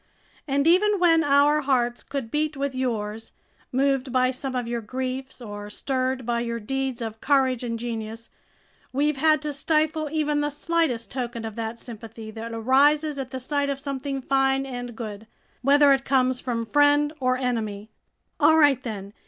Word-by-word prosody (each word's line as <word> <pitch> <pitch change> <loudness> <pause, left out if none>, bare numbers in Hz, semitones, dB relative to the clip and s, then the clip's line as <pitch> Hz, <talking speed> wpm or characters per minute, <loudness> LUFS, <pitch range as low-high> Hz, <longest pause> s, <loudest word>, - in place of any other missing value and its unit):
And 280 0 +1
even 405 +5 +4
when 330 -3 +4
our 290 +1 +4
hearts 245 -4 +1
could 270 -5 -5
beat 305 -1 -1
with 280 0 -2
yours, 225 -4 -3 0.4
moved 270 0 +1
by 255 0 +3
some 260 0 -5
of 245 -2 -2
your 235 0 -2
griefs 260 +3 -4
or 205 -3 -7
stirred 260 +2 -2
by 235 0 0
your 235 0 -3
deeds 265 +2 -3
of 225 -1 -6
courage 265 -3 +2
and 230 -1 -2
genius, 225 -1 -6 0.6
we've 290 +2 +1
had 310 +2 +3
to 300 -1 -2
stifle 310 +1 0
even 300 -2 0
the 295 - 0
slightest 295 -7 -1
token 240 -3 -4
of 220 -2 -6
that 225 0 -4
sympathy 225 -2 -9
that 225 +1 -7
arises 280 +6 +3
at 260 -2 -4
the 260 0 -5
sight 285 +2 -1
of 275 -1 -2
something 275 -1 -4
fine 270 0 +2
and 245 -3 -6
good, 215 -2 -7 0.3
whether 280 +2 +6
it 270 0 0
comes 255 -2 +2
from 235 -3 -2
friend 290 +3 +3
or 255 -1 +1
enemy. 220 -5 -3 0.5
All 320 0 +6
right 285 -5 +5
then! 205 -5 -6
260 Hz, 170 wpm, -25 LUFS, 235-285 Hz, 0.6 s, whether